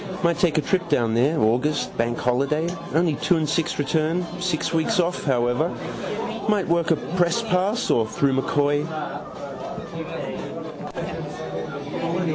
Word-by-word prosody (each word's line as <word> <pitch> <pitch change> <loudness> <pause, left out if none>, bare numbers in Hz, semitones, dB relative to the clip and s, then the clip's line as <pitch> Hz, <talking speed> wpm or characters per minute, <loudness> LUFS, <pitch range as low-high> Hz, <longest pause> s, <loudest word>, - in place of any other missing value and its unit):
Might 170 -1 +3
take 170 -4 +3
a - - +5
trip 175 +3 0
down 115 -6 +2
there. 135 +8 +3
August 125 +7 +1
bank 120 +1 +1
holiday, 140 +6 +1 0.3
only 165 -1 +4
two 175 +4 +2
and 155 -1 0
six 165 +1 0
return. 160 +4 +1 0.2
Six 180 -3 0
weeks 175 +6 +2
off, 175 +1 +1
however. 125 +3 +2 0.8
Might 205 -3 +2
work 170 0 +2
a - - +6 0.2
press 175 +4 +3
pass. 205 +2 +1
Or 110 -2 +3
through 140 +4 +1
M'Coy. 145 +1 +2
155 Hz, 125 wpm, -24 LUFS, 135-175 Hz, 0.8 s, a